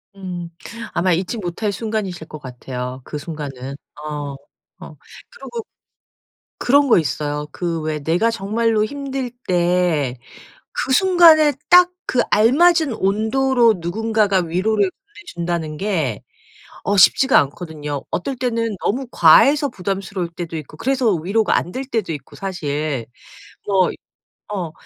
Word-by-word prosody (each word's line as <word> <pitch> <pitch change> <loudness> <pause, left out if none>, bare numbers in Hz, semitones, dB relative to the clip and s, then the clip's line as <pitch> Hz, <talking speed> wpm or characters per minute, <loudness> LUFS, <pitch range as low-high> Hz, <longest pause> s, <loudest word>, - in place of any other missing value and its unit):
음. 180 -3 -6 0.4
아마 180 +1 +2
잊지 185 +7 -2
못할 205 +2 -3
순간이실 200 -5 -4
것 155 - -9
같아요, 125 -1 -6
그 150 - -6
순간은. 140 -4 -6 0.3
어, 145 -2 -5 0.5
어. - - -11 0.4
그리고 470 - -7 1.0
그런 280 +2 +3
거 - - +6
있어요. 150 -1 -3
그 170 -2 -3
왜 155 0 -2
내가 170 +10 +1
정말로 220 +1 0
힘들 270 +1 -4 0.2
때 175 -7 +1 0.6
그 265 - -2
순간에 330 -3 +6 0.2
딱 360 0 +7 0.2
그 250 - +2
알맞은 295 +6 +4
온도로 230 +4 +2
누군가가 210 +3 +1
위로를 190 +4 +1 0.5
보내준다는 170 -3 -2
게 160 - -2 0.6
어 205 - +1
쉽지가 265 +8 +6
않거든요. 150 -1 -5
어떨 265 +10 -3
때는 230 -4 -1
너무 260 +6 0
과해서 280 - +6
부담스러울 195 -3 -4
때도 170 -1 -7
있고 155 0 -9
그래서 260 -1 +1
위로가 195 +6 +1
안 175 - -2
될 260 - -3
때도 225 -8 -2
있고, 140 -3 -10
사실. 150 - -3 0.6
뭐 190 -2 +3 0.6
어 180 -6 -3
190 Hz, 260 characters per minute, -20 LUFS, 155-230 Hz, 1.0 s, 딱